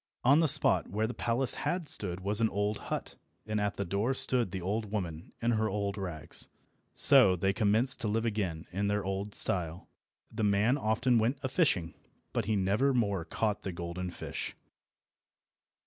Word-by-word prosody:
On 140 Hz, +5 st, +5 dB
the 165 Hz, -, +3 dB
spot -, -, +4 dB
where 105 Hz, +4 st, -1 dB
the 115 Hz, -, -4 dB
palace 120 Hz, +3 st, +1 dB
had 175 Hz, -3 st, -3 dB
stood 90 Hz, -7 st, -3 dB
was 100 Hz, +3 st, +1 dB
the 110 Hz, -1 st, +2 dB
old 105 Hz, +1 st, -2 dB
hut, -, -, -5 dB, 0.3 s
and 105 Hz, -1 st, -2 dB
at 100 Hz, -2 st, -1 dB
the 100 Hz, -, -2 dB
door 100 Hz, +8 st, -1 dB
stood 125 Hz, -5 st, -1 dB
the 95 Hz, -, -5 dB
old 100 Hz, +4 st, -3 dB
woman 85 Hz, -6 st, -5 dB
in 120 Hz, -, +2 dB
her 110 Hz, -1 st, 0 dB
old 100 Hz, 0 st, -2 dB
rags. 90 Hz, -7 st, -4 dB, 0.5 s
So 95 Hz, -, +7 dB
they 95 Hz, +2 st, 0 dB
commenced 110 Hz, +4 st, +3 dB
to -, -, -2 dB
live 110 Hz, +2 st, -1 dB
again 95 Hz, -8 st, -3 dB
in 100 Hz, +3 st, -2 dB
their 105 Hz, -1 st, -1 dB
old 95 Hz, +1 st, -4 dB
style. 85 Hz, -2 st, +3 dB, 0.4 s
The -, -, -3 dB
man 105 Hz, +5 st, +2 dB
often 115 Hz, -1 st, +1 dB
went 120 Hz, +6 st, 0 dB
a 130 Hz, -, -2 dB
fishing, 95 Hz, -, 0 dB, 0.4 s
but -, -, -1 dB
he 110 Hz, +1 st, 0 dB
never 105 Hz, +8 st, +1 dB
more 100 Hz, -7 st, 0 dB
caught 105 Hz, +5 st, -2 dB
the 95 Hz, -, -5 dB
golden 85 Hz, +1 st, -5 dB
fish. 85 Hz, -, -6 dB
105 Hz, 180 wpm, -30 LUFS, 95-115 Hz, 0.5 s, So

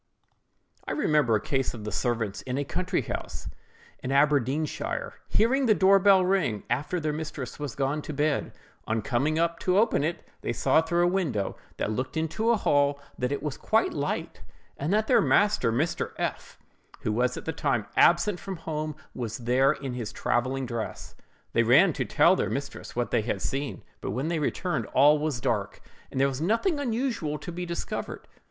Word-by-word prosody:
I -, -, -1 dB
remember 150 Hz, -, +2 dB
a -, -, +2 dB
case 135 Hz, +3 st, -1 dB
of 110 Hz, -, -8 dB
the 105 Hz, -, -4 dB
servants 115 Hz, -5 st, -1 dB
in 130 Hz, 0 st, -4 dB
a 145 Hz, -, 0 dB
country 180 Hz, 0 st, -1 dB
house, -, -, -5 dB, 0.5 s
in 130 Hz, -, -3 dB
Aberdeenshire, 150 Hz, -, +1 dB, 0.2 s
hearing 260 Hz, +4 st, +3 dB
the 215 Hz, -, +5 dB
door 195 Hz, +1 st, +5 dB
bell 190 Hz, -1 st, +5 dB
ring 165 Hz, -, +1 dB
after 150 Hz, +8 st, 0 dB
their 155 Hz, -2 st, -1 dB
mistress 150 Hz, -4 st, -5 dB
was 145 Hz, -5 st, -4 dB
gone 140 Hz, +2 st, -1 dB
to 155 Hz, -, -6 dB
bed; 150 Hz, 0 st, 0 dB, 0.4 s
on 110 Hz, -1 st, 0 dB
coming 140 Hz, +7 st, 0 dB
up 170 Hz, 0 st, +1 dB
to 185 Hz, 0 st, +1 dB
open 215 Hz, -8 st, +3 dB
it, 165 Hz, +3 st, -3 dB
they -, -, -2 dB
saw 160 Hz, -, +3 dB
through 170 Hz, +2 st, +1 dB
a -, -, +4 dB
window 160 Hz, -, -1 dB, 0.2 s
that -, -, -1 dB
looked 130 Hz, +8 st, -3 dB
into 160 Hz, +8 st, 0 dB
a 235 Hz, -, +4 dB
hall 145 Hz, -5 st, +2 dB, 0.2 s
that 125 Hz, +1 st, 0 dB
it 140 Hz, -, -2 dB
was 150 Hz, -3 st, -3 dB
quite 220 Hz, +1 st, +1 dB
light, 145 Hz, -, -3 dB, 0.3 s
and 145 Hz, +5 st, -2 dB
that 215 Hz, +1 st, +3 dB
their -, -, +4 dB
master, 205 Hz, -, +3 dB
Mr. 145 Hz, +9 st, -1 dB
F——, -, -, -4 dB, 0.4 s
who -, -, -1 dB
was 125 Hz, +3 st, +1 dB
at -, -, -7 dB
the 160 Hz, -, -2 dB
time 115 Hz, -7 st, 0 dB
absent 175 Hz, +2 st, +4 dB
from 195 Hz, -1 st, -5 dB
home, 155 Hz, -2 st, -4 dB, 0.2 s
was 115 Hz, -3 st, -4 dB
there 125 Hz, +3 st, +3 dB
in 135 Hz, -4 st, -4 dB
his 120 Hz, -4 st, -4 dB
travelling 130 Hz, +2 st, -1 dB
dress. 115 Hz, -2 st, -5 dB, 0.4 s
They 115 Hz, -, +4 dB
ran 140 Hz, +10 st, +5 dB
to 130 Hz, -3 st, -2 dB
tell 170 Hz, -, +4 dB
their -, -, -1 dB
mistress 140 Hz, 0 st, -5 dB
what 120 Hz, 0 st, -1 dB
they -, -, +3 dB
had 105 Hz, -2 st, -2 dB
seen; 135 Hz, -, -3 dB, 0.2 s
but -, -, -4 dB
when 135 Hz, +6 st, -2 dB
they 170 Hz, -2 st, 0 dB
returned, 175 Hz, +4 st, -1 dB
all 145 Hz, +3 st, +6 dB
was 150 Hz, -4 st, -1 dB
dark, 105 Hz, -5 st, -1 dB, 0.3 s
and 130 Hz, -, -4 dB
there 135 Hz, -, +4 dB
was 135 Hz, +1 st, -4 dB
nothing 230 Hz, -, +1 dB
unusual 230 Hz, -, -1 dB
to 175 Hz, -, -7 dB
be 175 Hz, +1 st, -5 dB
discovered. 170 Hz, 0 st, -5 dB
150 Hz, 190 wpm, -27 LUFS, 125-175 Hz, 0.5 s, all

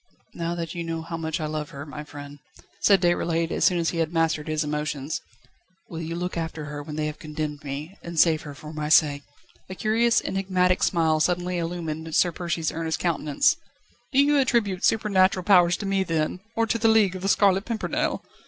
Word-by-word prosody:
"Now 170 Hz, 0 st, -3 dB
that 165 Hz, -1 st, -4 dB
you 170 Hz, -, -4 dB
know 165 Hz, -1 st, -4 dB
how 165 Hz, +1 st, -5 dB
much 160 Hz, +1 st, -3 dB
I 155 Hz, -, -2 dB
love 150 Hz, -1 st, -4 dB
her, 140 Hz, +1 st, -8 dB
my 150 Hz, 0 st, -7 dB
friend," 145 Hz, -1 st, -10 dB, 0.4 s
said 195 Hz, -3 st, +4 dB
Déroulède 170 Hz, -1 st, +1 dB
as -, -, +1 dB
soon 180 Hz, -, +4 dB
as 165 Hz, -1 st, 0 dB
he 170 Hz, -, -3 dB
had 160 Hz, -1 st, 0 dB
mastered 165 Hz, -2 st, 0 dB
his 155 Hz, 0 st, 0 dB
emotions, 150 Hz, -1 st, -3 dB, 0.7 s
"will 165 Hz, -1 st, -6 dB
you 165 Hz, +1 st, -4 dB
look 180 Hz, +1 st, -3 dB
after 160 Hz, -2 st, -4 dB
her 150 Hz, 0 st, -6 dB
when 150 Hz, +1 st, -7 dB
they 155 Hz, 0 st, -1 dB
have 150 Hz, 0 st, -5 dB
condemned 150 Hz, -1 st, -5 dB
me, 145 Hz, +6 st, -6 dB
and 170 Hz, -1 st, -4 dB
save 160 Hz, -2 st, +4 dB
her 145 Hz, -2 st, -9 dB
for 150 Hz, +2 st, -10 dB
my 150 Hz, -1 st, -3 dB
sake?" 145 Hz, -2 st, +4 dB, 0.5 s
A 185 Hz, -, -6 dB
curious, 230 Hz, +3 st, +2 dB
enigmatic 185 Hz, -1 st, 0 dB
smile 160 Hz, -3 st, +2 dB
suddenly 180 Hz, +2 st, 0 dB
illumined 160 Hz, -2 st, -4 dB
Sir 175 Hz, -, +4 dB
Percy's 170 Hz, -2 st, -2 dB
earnest 160 Hz, 0 st, -2 dB
countenance. 155 Hz, -4 st, +2 dB
"Save -, -, -6 dB
her? -, -, -37 dB
Do 265 Hz, -, +4 dB
you 290 Hz, 0 st, +3 dB
attribute 230 Hz, -8 st, +1 dB
supernatural 190 Hz, -4 st, +3 dB
powers 175 Hz, -3 st, +5 dB
to 205 Hz, -, -6 dB
me, 195 Hz, 0 st, +1 dB
then, 165 Hz, 0 st, -1 dB, 0.2 s
or 230 Hz, -, +2 dB
to 230 Hz, +1 st, -1 dB
The 225 Hz, -, +3 dB
League 215 Hz, -4 st, +4 dB
of 185 Hz, -, -6 dB
The 195 Hz, -, -1 dB
Scarlet 195 Hz, 0 st, +3 dB
Pimpernel?" 230 Hz, -2 st, -2 dB
165 Hz, 210 wpm, -25 LUFS, 155-185 Hz, 0.7 s, powers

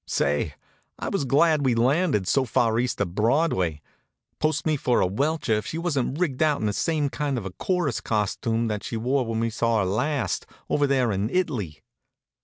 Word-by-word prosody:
Say, 75 Hz, +1 st, 0 dB, 0.4 s
I -, -, -4 dB
was 140 Hz, -, -1 dB
glad 150 Hz, +3 st, +3 dB
we'd 125 Hz, -3 st, +2 dB
landed 130 Hz, -, +2 dB
so 135 Hz, -, +3 dB
far 120 Hz, -2 st, +1 dB
east 125 Hz, 0 st, -1 dB
of 95 Hz, -4 st, -1 dB
Broadway. 105 Hz, -, +1 dB, 0.6 s
Post 155 Hz, -1 st, 0 dB
me 155 Hz, -1 st, +2 dB
for 125 Hz, -3 st, +1 dB
a -, -, +3 dB
welcher 140 Hz, -, 0 dB
if 105 Hz, 0 st, -1 dB
she 160 Hz, -, -4 dB
wasn't 145 Hz, -6 st, -1 dB
rigged 155 Hz, -7 st, -1 dB
out 150 Hz, -2 st, +3 dB
in -, -, -2 dB
the 105 Hz, -, 0 dB
same 155 Hz, +4 st, 0 dB
kind 140 Hz, -1 st, -2 dB
of 110 Hz, -, -4 dB
a 95 Hz, -, -4 dB
chorus 175 Hz, -, -1 dB
costume 115 Hz, +2 st, -1 dB
that 105 Hz, -2 st, -3 dB
she 115 Hz, -, -4 dB
wore 125 Hz, +2 st, 0 dB
when 115 Hz, 0 st, -1 dB
we 115 Hz, 0 st, 0 dB
saw 115 Hz, 0 st, +1 dB
her 100 Hz, -, +1 dB
last, 125 Hz, +7 st, -1 dB, 0.2 s
over 145 Hz, -1 st, +3 dB
there 130 Hz, -4 st, +2 dB
in 100 Hz, +2 st, -1 dB
It'ly! 125 Hz, -, -2 dB
125 Hz, 200 wpm, -25 LUFS, 110-150 Hz, 0.6 s, glad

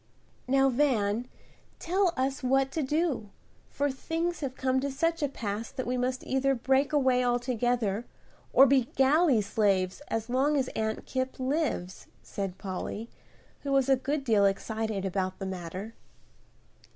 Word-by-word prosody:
"Now, 270 Hz, +1 st, +4 dB
Van, 240 Hz, -4 st, +1 dB, 0.5 s
tell 370 Hz, +1 st, +1 dB
us 265 Hz, +1 st, -1 dB
what 270 Hz, +1 st, +2 dB
to 315 Hz, -, -1 dB
do, 290 Hz, -6 st, 0 dB, 0.4 s
for 285 Hz, 0 st, -1 dB
things 330 Hz, +6 st, -2 dB
have 270 Hz, -3 st, -4 dB
come 260 Hz, 0 st, +1 dB
to 280 Hz, +1 st, -2 dB
such 330 Hz, +5 st, 0 dB
a 290 Hz, -, +2 dB
pass 220 Hz, -3 st, -4 dB
that 265 Hz, -2 st, -5 dB
we 250 Hz, -, -1 dB
must 255 Hz, +1 st, -1 dB
either 270 Hz, +1 st, +1 dB
break 265 Hz, +4 st, +2 dB
away 260 Hz, -4 st, +3 dB
altogether 245 Hz, -3 st, 0 dB, 0.4 s
or 270 Hz, -, +8 dB
be 265 Hz, -2 st, +4 dB
galley 270 Hz, -2 st, +4 dB
slaves 200 Hz, -1 st, +1 dB
as 225 Hz, 0 st, -2 dB
long 270 Hz, +4 st, +2 dB
as 260 Hz, -2 st, 0 dB
Aunt 220 Hz, 0 st, -3 dB
Kipp 260 Hz, 0 st, -3 dB
lives," 260 Hz, -, -2 dB, 0.2 s
said 195 Hz, -2 st, -5 dB
Polly, 200 Hz, +4 st, -5 dB, 0.5 s
who 280 Hz, -, -4 dB
was 275 Hz, -1 st, +3 dB
a 270 Hz, -, +6 dB
good 275 Hz, +3 st, -2 dB
deal 215 Hz, -6 st, +3 dB
excited 215 Hz, 0 st, -2 dB
about 185 Hz, 0 st, -2 dB
the 195 Hz, -, -5 dB
matter. 185 Hz, +3 st, -6 dB
255 Hz, 150 wpm, -29 LUFS, 220-275 Hz, 0.5 s, or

